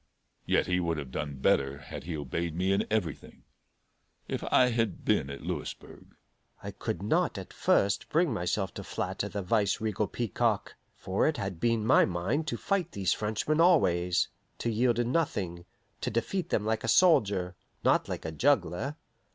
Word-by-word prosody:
Yet - - +3
he 90 0 +1
would 85 -2 -1
have 70 -4 -6
done 70 +1 -4
better 70 +1 +1
had 70 +2 -9
he 85 -2 -3
obeyed 80 +4 -3
me 95 +2 +1
in 100 - 0
everything. 105 -8 -3 0.8
If - - -3
I 125 -1 +5
had 115 -5 -1
been 65 - +2
at 70 - -7
Louisburg - - -7 0.2
" - - -33
I - - -5
could 90 - -4
not 105 - +1
at - - -8
first 100 0 +2
bring 160 -4 +2
myself 95 0 -1
to - - -7
flatter - - -3
the 100 -2 -4
vice 100 +2 +1
regal 105 -1 -1
peacock; 120 -5 -1 0.2
for 95 +2 0
it 155 - 0
had 95 -4 -4
been 115 0 +1
my 120 - +6
mind 95 - -1
to - - -2
fight 190 -4 -1
these 95 -2 +1
Frenchmen 110 +9 0
always; 90 - +3 0.3
to 115 - -1
yield 120 +1 +2
in 120 0 0
nothing; 95 - -1 0.4
to - - -1
defeat 170 - -2
them 105 - 0
like 110 0 0
a - - -2
soldier, 100 - +4 0.3
not - - +3
like - - -5
a 80 - -3
juggler. 110 - +1
100 Hz, 175 wpm, -29 LUFS, 85-120 Hz, 0.8 s, my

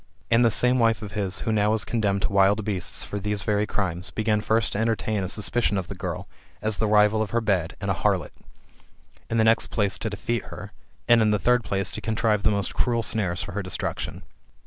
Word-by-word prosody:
And 115 +1 +5
this 115 -2 +3
same 125 +1 +4
wife 115 -2 +2
of 105 - -7
his, 100 -3 -3
who 115 - -1
was - - +1
now 105 +1 +2
condemned 100 -4 0
to - - -1
wild 100 +2 +3
beasts 95 -4 -2
for 105 - -5
these 105 0 -3
very 105 -1 0
crimes, 90 -4 -1
began 110 -1 0
first 110 +1 +1
to 105 - -2
entertain 110 -2 0
a 95 - -3
suspicion 105 +1 0
of 90 -3 -4
the - - -4
girl, - - -5 0.3
as 110 -2 -1
the 110 - +2
rival 105 +1 +4
of 110 - -2
her 120 - +1
bed, 95 -7 0
and - - -1
a - - +2
harlot; - - 0 1.0
in 115 - 0
the 110 - +4
next 110 +1 +3
place 100 -3 -1
to 110 - -2
detest 115 +3 -3
her; 100 0 -9 0.4
and 120 -1 +6
in 110 - +3
the 105 - +3
third 125 +4 +2
place 95 0 -1
to - - -6
contrive 110 -2 +1
the 110 - +3
most 100 -1 0
cruel 120 -2 0
snares 100 -6 -1
for 100 - -7
her 100 +2 -3
destruction. 90 -2 -4
105 Hz, 230 wpm, -25 LUFS, 100-110 Hz, 1.0 s, and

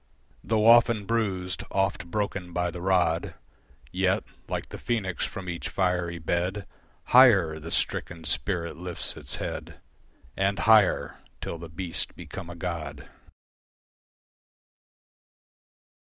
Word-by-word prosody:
Though 110 -1 +1
often 115 -2 +6
bruised, 95 -5 -1
oft 95 -2 0
broken 100 -3 -3
by 90 0 0
the 90 - -7
rod, 90 -3 +1 0.6
Yet, - - +1 0.3
like - - -3
the - - -8
phoenix, 100 -8 -1
from 95 -1 -7
each 85 -1 -4
fiery 90 -2 0
bed 90 +4 -1 0.4
Higher 100 -12 +6
the 80 +2 -7
stricken 85 0 -1
spirit 85 +4 0
lifts 80 -9 -3
its - - -6
head - - -5 0.6
And 95 +1 +1
higher 110 -4 +4 0.2
till 85 - -5
the 85 0 -8
beast 85 +1 -3
become 85 - -8
a 85 - -7
god. 80 -5 -5
90 Hz, 115 wpm, -27 LUFS, 85-100 Hz, 0.6 s, often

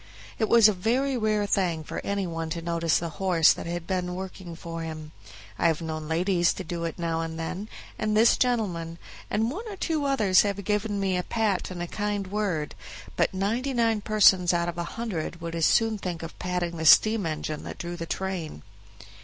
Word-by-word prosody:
It 220 - +1
was 230 -2 +8
a 215 - +3
very 250 +8 0
rare 215 -3 +1
thing 180 -6 0
for - - -5
any 200 -1 -1
one 165 -2 -4
to 165 +1 -3
notice 170 -1 +1
the 170 - -3
horse 175 -4 +5
that - - -7
had 170 0 -4
been 180 -1 -2
working 185 -2 -7
for 165 0 -6
him. 155 -1 -6 0.5
I - - +4
have 160 -2 +1
known 155 -2 -5
ladies 175 +2 +2
to - - -5
do 170 0 -4
it 165 - -4
now 165 -1 -1
and 165 0 -5
then, 180 +6 -4 0.3
and 215 0 +1
this 230 +2 +6
gentleman, 180 -10 -1 0.3
and 220 +3 0
one 425 - -6
or 415 - -6
two 320 -5 -1
others 215 -10 +4
have 200 -1 -2
given 210 +1 -1
me 190 -2 +1
a - - +1
pat 215 -1 -1
and 175 -2 -5
a - - -4
kind 205 +1 -2
word; 185 -6 -2 0.4
but - - +2
ninety 225 +8 -1
nine 225 -2 +2
persons 190 -5 +5
out 170 0 0
of 175 0 -4
a - - 0
hundred 180 -8 -3
would 165 -1 -5
as 165 -1 +2
soon 225 -2 +2
think 175 -4 -4
of 165 - -9
patting 180 -2 -2
the 160 - -3
steam 215 +1 +6
engine 155 -1 -3
that - - -7
drew 175 0 -5
the 165 -1 -6
train. 175 - -4
180 Hz, 210 wpm, -26 LUFS, 165-210 Hz, 0.5 s, was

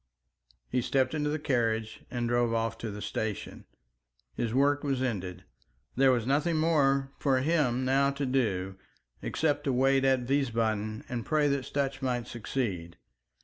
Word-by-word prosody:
He 125 - 0
stepped 130 +3 +1
into 150 -1 0
the 150 - 0
carriage 115 -6 -1
and 120 -1 -2
drove 120 -1 +2
off 115 0 0
to 115 - -4
the 105 0 -6
station. 110 -1 -4 0.7
His 115 - -2
work 140 +3 +2
was 135 -3 0
ended. 95 -8 -3 0.5
There 135 +1 +5
was 120 -3 +1
nothing 150 +6 +1
more 140 -4 +2
for 130 -3 +2
him 135 -5 +1
now 135 +1 +3
to 140 0 -2
do, 100 -8 0 0.4
except 150 -2 0
to 135 - +1
wait 135 +1 +3
at 130 -2 +2
Wiesbaden 110 -5 0
and 120 -2 -3
pray 150 +2 +2
that 140 -2 0
Sutch 140 -1 -2
might 125 -3 -1
succeed. 100 -8 -4
130 Hz, 155 wpm, -29 LUFS, 115-140 Hz, 0.7 s, There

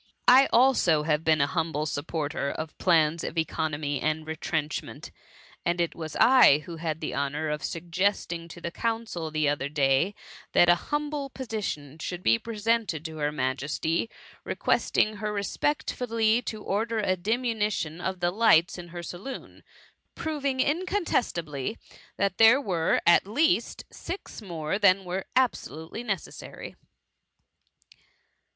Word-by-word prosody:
I 260 +2 +8
also 230 - +4
have 150 0 +1
been 160 -2 +3
an 140 - +2
humble 160 -2 -1
supporter 150 -1 -2
of 155 +1 -5
plans 165 -2 +3
of - - -5
economy 150 -3 -1
and 155 0 -1
retrenchment; 155 -1 -4 0.5
and 175 +1 0
it 170 -1 0
was 160 -2 -7
I 235 - +6
who 170 -2 -7
had 160 -1 -3
the 155 - -3
honour 145 +3 -2
of 150 0 -3
suggesting 170 0 -1
to 170 - -11
the 170 - -5
council, 225 -7 -3
the 155 -1 0
other 145 -1 -1
day, 145 +6 +2 0.4
that 175 - +6
an 175 - +7
humble 295 - -3
petition 205 - -5
should 180 +2 -5
be 115 0 +4
presente(j» 225 -7 -1
to 160 -1 -6
her 150 -1 0
Majesty, 150 - -1 0.3
requesting 215 0 +1
her 210 0 -3
respectfully 225 +1 0
to 215 -3 -6
order 225 +3 -1
a 195 -3 +1
diminution 210 -5 -1
of 190 0 -3
the 175 0 +2
lights 185 -5 +4
in 175 - -8
her 175 0 -7
saloon^ 180 +10 -8 0.5
proving 280 -4 -2
incontestably, 250 - -1 0.4
that 200 -2 0
there 225 +4 +7
were, 180 -10 +1
at 170 +2 +5
least, 315 - +1
six 360 -8 -7
more 170 -1 -3
than 195 -2 +4
were 185 +2 -3
absolutely 220 - -1
necessary. 200 -7 -6
175 Hz, 135 wpm, -27 LUFS, 155-225 Hz, 0.5 s, I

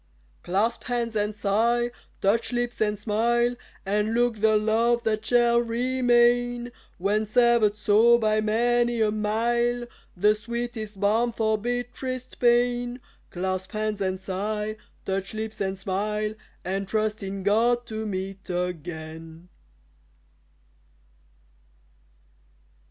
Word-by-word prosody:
Clasp 210 +6 -1
hands 235 -2 -2
and 210 0 0
sigh, 230 +4 +1 0.3
touch 210 +6 +1
lips 240 -2 -2
and 210 -1 +1
smile, 235 +3 +1 0.3
And 210 +3 0
look 240 -1 +2
the 215 -1 +4
love 230 +3 +2
that 215 -1 0
shall 240 0 +4
remain 245 0 +2 0.3
When 210 +4 0
severed 235 -2 +4
so 215 +3 +5
by 215 -2 +1
many 240 +2 +1
a 215 -1 +3
mile 235 +3 0 0.3
The 210 +4 +4
sweetest 220 -1 -5
balm 220 +4 +2
for 220 -1 +1
bitterest 245 +3 -4
pain; 245 0 +2 0.3
Clasp 185 +1 -3
hands 215 -1 -2
and 190 -1 -1
sigh, 210 +3 -3 0.3
touch 195 +2 -3
lips 220 -1 -5
and 190 0 -1
smile, 210 +3 -2 0.3
And 195 +1 -2
trust 215 +1 -1
in 195 0 -5
GOD 235 +4 +2
to 220 -1 -4
meet 190 0 -5
again. 165 -1 -5
220 Hz, 115 wpm, -26 LUFS, 205-240 Hz, 0.3 s, so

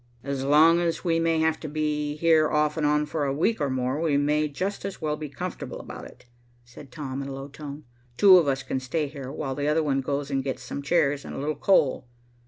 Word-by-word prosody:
"As 140 -1 -3
long 155 +4 +5
as 170 -1 -1
we 165 -2 +1
may 165 0 +2
have 160 0 +1
to 155 - -6
be 150 -1 -2
here 160 -1 +3
off 150 0 +1
and 155 -2 +1
on 150 0 +2
for 150 0 -3
a 140 - 0
week 160 +7 0
or 145 - +1
more, 130 +3 -1
we 155 -4 +2
may 150 +1 +1
just 185 +8 -4
as 195 -1 -5
well 150 -2 -1
be 150 -1 -7
comfortable 180 +5 -6
about - - -9
it," - - -15 0.4
said 125 +2 -13
Tom, 135 0 -5
in 135 - -5
a - - -6
low 135 +1 -7
tone. 145 +1 -9 0.3
"Two 190 -3 +8
of 165 - 0
us 135 -1 0
can 130 0 -2
stay 140 +5 -2
here, 140 -2 -7
while 135 -1 -4
the 145 +2 -2
other 155 +1 +2
one 135 -2 0
goes 140 +1 -3
and 135 -1 0
gets 135 -1 -4
some 140 - -5
chairs 145 -2 +1
and - - -8
a - - -6
little 145 +3 -1
coal. 145 -5 +2
150 Hz, 245 wpm, -26 LUFS, 140-160 Hz, 0.4 s, Two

